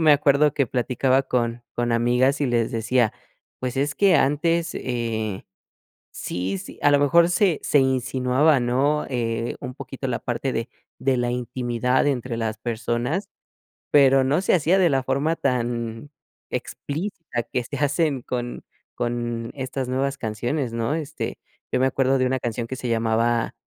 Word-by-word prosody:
me 155 -2 +6
acuerdo 145 0 +4
que 140 -1 +1
platicaba 130 +2 +1
con 120 -2 -1
con 120 0 -1
amigas 125 +4 +2
y - - +2
les 120 -2 +1
decía, 115 0 +1 0.5
pues 130 0 -3
es 145 +1 0
que 195 -4 +5
antes, 165 +4 +1
eh 115 -5 -3 0.7
sí 95 +2 -3
sí 95 - -10
a 145 - +5
lo 145 - +6
mejor 170 +4 +5
se 180 -1 +2
se - - +2
insinuaba 130 +2 +2
¿no?, 135 +5 +1
eh, 115 -2 -2
un 125 0 -7
poquito 135 0 -6
la 120 -2 -1
parte 125 +2 -2
de 115 +1 -2 0.3
de 135 -1 +1
la 120 0 0
intimidad 125 +1 0
entre 125 -4 -1
las 110 -1 -2
personas, 120 - -2 0.6
pero 135 -2 +6
no 140 +5 +2
se 195 - +2
hacía 175 +2 +3
de 180 -3 +4
la 135 -2 +1
forma 140 +5 0
tan 120 -1 -2 0.4
explícita 155 - -4
que 125 - -2
se - - -6
hacen 145 -1 +1
con 120 0 -4 0.3
con 120 -1 -3
estas 130 -1 -4
nuevas 135 +2 -1
canciones, 120 +4 -2
¿no? 115 +4 -1
Este, 155 -1 -4 0.3
yo - - +3
me 130 - +4
acuerdo 135 0 +2
de 130 - +2
una 130 +1 0
canción 120 -1 -3
que 130 - -4
se 125 - -4
llamaba 115 +1 +1
130 Hz, 160 wpm, -23 LUFS, 120-140 Hz, 0.7 s, me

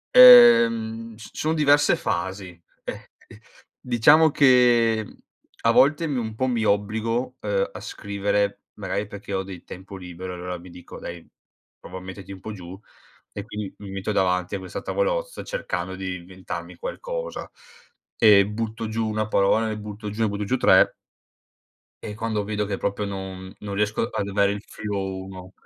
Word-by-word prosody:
Ehm, 115 - +7
c 110 - -16
ci - - -10
son 155 +1 +1
diverse 145 -1 +4
fasi. 95 +1 -3 0.3
Eh, - - -3 0.4
ehm, - - -15 0.4
diciamo 145 +7 +5
che, 120 -5 +4
mhmm, - - -15 0.5
a 115 - +4
volte 145 +7 +4
mi 140 -3 -2
un 110 -2 -4
po' 130 +3 0
mi 120 -3 0
obbligo, 110 +5 0
uhm, 100 -2 -1
a - - -9
scrivere 100 0 -2
magari 100 0 -3
perché 100 -1 -8
ho 95 0 -1
del 95 -2 -10
tempo 95 +2 -10
libero 90 0 -7
e - - -6
allora 90 0 -5
mi 90 +1 -13
dico: 90 0 -11
“Dai, 85 -1 -8 0.5
prova 95 - -9
a - - -13
metterti 95 +1 -9
un 95 - -12
po' 110 - -6
giù”, 95 -2 -9 0.5
e 100 - -7
quindi 105 -3 -6
mi 100 -1 -9
metto 95 +2 -3
davanti 90 -1 0
a - - -3
questa 95 -1 -7
tavolozza - - -2
cercando 95 - -4
di 95 -1 -4
inventarmi 95 +1 -8
qualcosa - - -5 0.7
e 105 -3 +6
butto 110 +1 -4
giù 110 0 -1
1 110 0 -1
parola, 110 +3 +2
NE 110 -1 -3
butto 105 0 -7
giù 105 +2 -5
ne - - +3
butto 100 0 -3
giù 125 +6 0
3 - - +5 1.1
e 105 - -6
quando 110 -1 -2
vedo 105 0 -2
che 100 -1 -3
proprio 100 +1 -2
non 95 -1 -7
non 100 -1 -6
riesco 105 +3 0
ad 100 - -3
avere 100 0 +2
il 100 0 -7
filo, 100 -2 -4
1 95 -1 -10
105 Hz, 175 wpm, -24 LUFS, 95-115 Hz, 1.1 s, Ehm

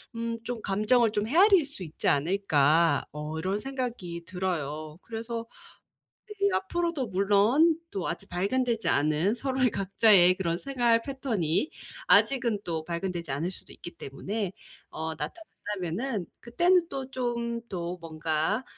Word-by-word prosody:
음 230 0 -2
좀 240 -2 -4
감정을 215 +3 +3
좀 205 -1 0
헤아릴 370 - +6
수 280 -9 -7
있지 155 -1 -5
않을까?' 155 -1 +3
어 150 +1 -5
이런 190 +5 -1
생각이 235 -10 -5
들어요. 155 -4 -3
그래서 230 0 -5 0.8
네 420 - -8 0.2
앞으로도 340 - -1
물론 205 - +4
또 190 -3 -3
아직 170 - -5
발견되지 225 +5 0
않은 155 +8 +2
서로의 260 -1 +1
각자의 195 -2 +5
그런 170 -3 -1
생활 240 -4 +2
패턴이 245 - -1 0.4
아직은 240 -6 +4
또 160 -2 -3
발견되지 170 -3 -3
않을 160 +6 -1
수도 - - -10
있기 175 - -10
때문에 190 +8 -4 0.4
어 160 +1 -4
나타난다면은 210 - -4
그때는 345 +8 +2
또 265 -3 -5
좀 235 -2 -2
또 175 -1 -4
뭔가 160 +7 -1
205 Hz, 280 characters per minute, -28 LUFS, 170-250 Hz, 0.8 s, 헤아릴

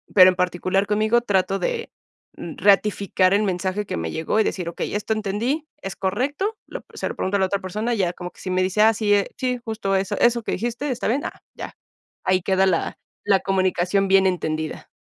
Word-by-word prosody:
pero 185 -2 +9
en 185 - -6
particular 185 +2 0
conmigo 215 +3 +2
trato 195 -3 +1
de, 465 -2 -2 0.5
mm, 165 - -7
ratificar 200 -1 +3
el 210 - +2
mensaje 190 +1 -1
que - - -4
me 80 -1 -3
llegó 160 +7 -1
y - - +5
decir: 180 -5 -3
"Okey, 170 - -4
esto 210 +1 -1
entendí, 220 +9 -2 0.2
¿es 195 0 -5
correcto?" 285 - -1
Lo, - - -8
se - - -3
lo - - -5
pregunto 200 +2 0
a - - -2
la 190 - +3
otra 200 +1 -1
persona, 215 +6 -2
ya 185 -6 0
como 180 0 -7
que - - -21
si 185 - -5
me 185 0 +1
dice: 190 +3 +1
"Ah, 220 +1 +6
sí, 210 -2 +2 0.2
sí, 250 -1 -1
justo 215 -3 -1
eso 190 0 -1
eso 240 0 +3
que - - -2
dijiste, 240 +7 -3
está 245 -3 -2
bien", 265 +6 0
ah, - - -6 0.2
ya. - - -7 0.5
Ahí 185 0 +2
queda 190 +1 +2
la 185 -3 0 0.3
la 200 -2 +4
comunicación 190 0 +1
bien 195 0 +5
entendida. 160 -4 -3
195 Hz, 210 wpm, -23 LUFS, 185-220 Hz, 0.5 s, pero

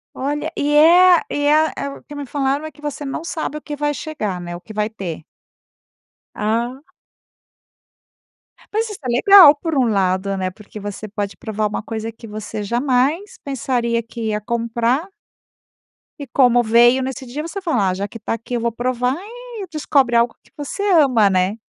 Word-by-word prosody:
Olha, 290 +3 -2
e 295 +1 0
é 350 +3 +7
e 290 0 -1
é 310 +2 +4
é - - -3
o 275 - -11
que 295 - -12
me 290 -1 -5
falaram 275 +2 -1
é 315 - -5
que 300 - -20
você 295 0 -5
não 275 +3 -4
sabe 310 -2 -4
o - - -13
que 295 0 -6
vai 295 0 0
chegar, 215 - -4
né. 175 0 -6
O - - -10
que 215 - -12
vai 210 0 -1
ter. 190 -8 -6 1.1
Ah. 235 +5 -1 1.9
Mas 440 +1 -1
isso 420 - -8
é - - -3
legal 305 +6 +8
por 320 +1 -3
um 255 -3 +3
lado, 195 -1 0
né. 185 -1 -2
Porque 210 +2 -12
você 205 +1 -6
pode 205 -1 -4
provar 215 -3 -2
uma 210 - -3
coisa 225 0 -5
que 225 - -13
você 210 0 -6
jamais 260 - 0
pensaria 240 -4 -1
que 230 0 -6
ia 210 -1 -1
comprar 235 - -1 1.1
E 285 - -5
como 245 -1 +4
veio 240 +3 +5
nesse 260 0 -5
dia, 260 +5 -5
você 365 +4 -5
fala: 245 - +1
"Ah, - - -1
já 200 +2 -3
que 230 - -9
está 220 - -4
aqui, 230 +2 -6
eu 240 - 0
vou 235 0 -1
provar." 250 +2 -1 0.4
e 390 - -5
descobre 280 -5 +1
algo 235 0 +3
que - - -27
você 295 +7 -5
ama, 255 -10 +5
né. 190 +3 0
245 Hz, 190 wpm, -20 LUFS, 215-290 Hz, 1.9 s, legal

